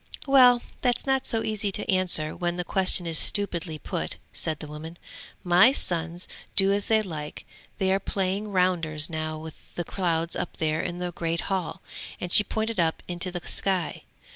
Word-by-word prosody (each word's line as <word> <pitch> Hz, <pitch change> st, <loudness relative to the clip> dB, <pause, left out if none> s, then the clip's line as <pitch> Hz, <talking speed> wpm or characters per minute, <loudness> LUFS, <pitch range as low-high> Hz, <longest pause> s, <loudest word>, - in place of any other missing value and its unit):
'Well 250 Hz, -3 st, +6 dB, 0.2 s
that's 245 Hz, -2 st, 0 dB
not 270 Hz, -1 st, +1 dB
so 225 Hz, -1 st, 0 dB
easy 210 Hz, -2 st, -1 dB
to -, -, -2 dB
answer 180 Hz, -5 st, +2 dB
when 175 Hz, 0 st, -2 dB
the 180 Hz, -, -1 dB
question 185 Hz, -1 st, +1 dB
is 165 Hz, -2 st, +7 dB
stupidly 170 Hz, -5 st, 0 dB
put,' -, -, -4 dB, 0.2 s
said 155 Hz, -2 st, -3 dB
the 155 Hz, -, -8 dB
woman. 155 Hz, +3 st, -9 dB, 0.5 s
'My 180 Hz, +7 st, +6 dB
sons 170 Hz, -4 st, -1 dB, 0.3 s
do 195 Hz, 0 st, +5 dB
as 200 Hz, 0 st, 0 dB
they 220 Hz, -1 st, +3 dB
like; 155 Hz, -6 st, -7 dB, 0.3 s
they 190 Hz, -1 st, +1 dB
are 195 Hz, -, +2 dB
playing 195 Hz, +2 st, -2 dB
rounders 175 Hz, -5 st, +2 dB
now 155 Hz, 0 st, -3 dB
with 155 Hz, 0 st, -12 dB
the 175 Hz, -, -2 dB
clouds 170 Hz, -3 st, -1 dB
up -, -, -4 dB
there 155 Hz, 0 st, 0 dB
in 175 Hz, -, -4 dB
the 180 Hz, 0 st, -3 dB
great 165 Hz, 0 st, -2 dB
hall,' 185 Hz, -4 st, -3 dB, 0.4 s
and 180 Hz, -, -5 dB
she 210 Hz, -, +5 dB
pointed 220 Hz, 0 st, -3 dB
up 165 Hz, -1 st, +1 dB
into 180 Hz, +1 st, -2 dB
the 175 Hz, -1 st, -6 dB
sky. 190 Hz, -4 st, -1 dB
180 Hz, 180 wpm, -26 LUFS, 165-200 Hz, 0.5 s, is